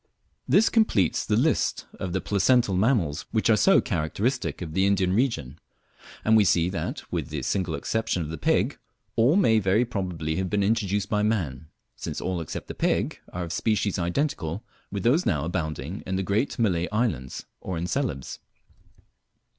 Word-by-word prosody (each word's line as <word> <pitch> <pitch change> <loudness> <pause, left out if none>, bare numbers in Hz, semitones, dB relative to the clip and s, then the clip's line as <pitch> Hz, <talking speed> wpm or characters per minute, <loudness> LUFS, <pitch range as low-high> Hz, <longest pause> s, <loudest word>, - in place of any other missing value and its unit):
This 220 +3 +5
completes 215 - +2
the - - 0
list - - +1
of 95 - -3
the 95 +1 -1
placental 105 0 +2
mammals 95 - +1
which - - +2
are - - +6
so - - +5
characteristic 110 - -1
of 80 -4 -6
the 95 +3 +3
Indian 95 -2 +2
region; 80 - -1 0.7
and 110 - +5
we 110 - +6
see 90 -2 +3
that, 95 - -4
with - - -2
the - - -4
single 90 -5 -1
exception 110 -6 -1
of 75 - -6
the 80 - -5
pig, - - +1 0.4
all 120 +8 +4
may 115 - +4
very 105 +4 +2
probably 90 -8 -3
have 95 -1 -1
been 100 +1 +1
introduced 100 -2 0
by 105 0 +1
man, 80 - -1 0.3
since 80 - -5
all 90 -2 -2
except 80 - -6
the - - -5
pig - - 0
are 90 - -4
of 85 0 -5
species 105 -2 0
identical 90 - -1 0.3
with 100 -1 -3
those 145 +10 +3
now 75 -4 +1
abounding 80 0 -3
in 95 - -1
the 95 - 0
great 105 +8 0
Malay 90 -8 +1
islands, 100 - -2
or 95 -2 -4
in 85 - -2
Celebes. 90 - -3
95 Hz, 175 wpm, -26 LUFS, 85-110 Hz, 0.7 s, are